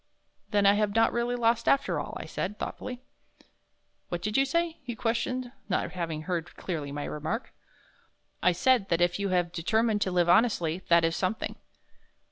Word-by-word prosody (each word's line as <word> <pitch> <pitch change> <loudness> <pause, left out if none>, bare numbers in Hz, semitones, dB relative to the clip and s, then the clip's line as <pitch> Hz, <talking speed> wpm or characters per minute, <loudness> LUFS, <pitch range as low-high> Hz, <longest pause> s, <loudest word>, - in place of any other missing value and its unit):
"Then 205 -2 +2
I 200 - +7
have 205 0 0
not 225 0 +4
really 235 +1 0
lost 235 -1 +1
after 275 - +2
all," - - -5
I - - -6
said, 205 +3 -4
thoughtfully. 250 0 -6 1.1
"What 175 -1 -4
did 210 0 -2
you 270 - +4
say?" 335 +3 -1
he 245 -4 -6
questioned, 240 +2 -1 0.2
not 185 - 0
having 165 -4 -4
heard 175 -1 -3
clearly 155 -6 -4
my 145 0 -4
remark. 160 - -4 0.9
"I 180 - +5
said 210 +3 +2
that 170 - +2
if 175 +1 +2
you 200 -1 -1
have 175 -2 +1
determined 215 +5 +1
to 190 - +1
live 175 -1 +2
honestly, 175 -4 +3
that 170 -1 +5
is 165 0 0
something." 190 +4 -2
200 Hz, 175 wpm, -28 LUFS, 175-235 Hz, 1.1 s, I